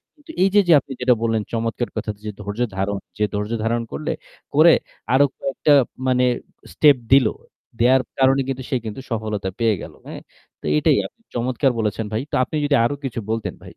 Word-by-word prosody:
কিন্তু 295 +1 -13
এইযে, 195 +2 +4
যে 165 - +8
আপনি 140 - -13
যেটা 125 0 +5
বললেন 115 -1 +1
যে - - -34
চমৎকার 115 +1 -2
কথা 110 0 -2
যে 105 - -3
ধৈর্য 105 +3 -5 0.2
ধারণ, 100 +1 -1 0.2
যে 105 - 0
ধৈর্য 105 +2 -2
ধারণ 115 +1 +1
করলে 155 - -3 0.4
করে 160 +2 +7 0.4
আরো 140 +2 +6
কয়েকটা 140 +2 +1 0.3
মানে 125 0 +3 0.5
স্টেপ 145 -3 +5 0.2
দিলো, 130 -5 +5 0.5
দেওয়ার 130 +2 +5 0.2
কারনে 135 +1 +4
কিন্তু 130 -1 -3
সে 140 - 0
কিন্তু 110 +4 -6
সফলটা 110 -3 -2
পেয়ে 115 -2 +3
গেলো। - - -10
হ্যাঁ? - - -8 0.4
তো - - -11
এইটাই 75 - +3
আপনি - - -34
চমৎকার 125 +2 +1
বলেছেন 110 0 -1
ভাই। 110 - 0
তা - - -1
আপনি 155 - -7
যদি 145 - +3
আরো 145 +4 0
কিছু 120 -3 -3
বলতেন 115 -1 -2
ভাই। - - -16
120 Hz, 190 wpm, -21 LUFS, 110-135 Hz, 0.5 s, যে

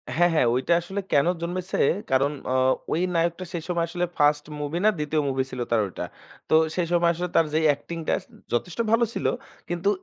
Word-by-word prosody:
হ্যাঁ, 175 +2 +4
হ্যাঁ। 155 - +3
ঐটা 130 +7 +2
আসলে 190 +4 -4
কেনো 145 +4 +4
জন্মেছে, 180 +2 -3 0.3
কারণ 135 +2 +3 0.2
অ - - +1 0.4
ওই 165 - +1
নায়কটা 170 +2 0
সেই 170 -2 -3
সময় 170 -2 0
আসলে 175 +1 -1
ফাস্ট 150 0 +3 0.2
মুভি 150 +3 -3
না - - +7
২য় 150 0 0
মুভি 130 0 0
ছিল 130 - -6
তার 115 - +4
ঐটা। 95 - -6 0.5
তো - - +1 0.2
সেই 180 -2 0
সময় 170 -1 +4
আসলে 180 +2 -3
তার 165 - +5
যেই 160 +1 +2
acting 165 +4 -7
টাছ - - +1
উম - - -18
যথেষ্ট 160 - -2
ভালো 230 +1 +4
ছিল। - - -4 0.4
কিন্তু 175 +3 0
165 Hz, 205 wpm, -25 LUFS, 145-175 Hz, 0.5 s, না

